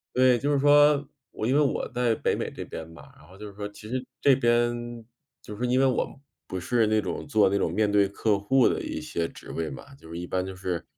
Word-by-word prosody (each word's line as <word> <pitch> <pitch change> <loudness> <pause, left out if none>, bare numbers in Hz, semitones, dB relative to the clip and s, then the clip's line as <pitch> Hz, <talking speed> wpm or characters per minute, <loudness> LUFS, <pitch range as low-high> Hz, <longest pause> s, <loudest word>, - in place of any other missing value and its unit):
对， 125 -1 +5
就 145 +4 0
是 145 - +3
说， 145 0 +5 0.2
我 - - -4
因 125 - +2
为 145 - +4
我 140 - 0
在 120 -2 +1
北 - - 0
美 - - -3
这 - - -8
边 80 - -7
嘛。 85 - -14
然 75 - -18
后 95 +2 -16
就 105 - -8
是 100 - -11
说 105 +1 -5
其 105 +1 -12
实 130 +2 -3 0.2
这 140 -2 +5
边， 120 -1 0 0.4
就 105 - -9
是 - - -13
说 125 - 0
因 130 - +3
为 135 - +4
我 130 +1 -1 0.3
不 95 - -4
是 115 +4 +1
那 110 0 +2
种 95 - -5
做 110 -8 +4
那 100 - +1
种 - - 0
面 105 -1 +1
对 100 -1 +4
客 100 +1 0
户 125 +5 +3
的 - - 0
一 - - -4
些 85 -1 -3
职 - - -12
位 80 -1 -3
嘛。 140 - -10
就 80 - -16
是 85 - -6
一 90 - -5
般 90 +1 -1
就 95 0 -7
是， 90 -2 -3
110 Hz, 285 characters per minute, -26 LUFS, 95-130 Hz, 0.4 s, 对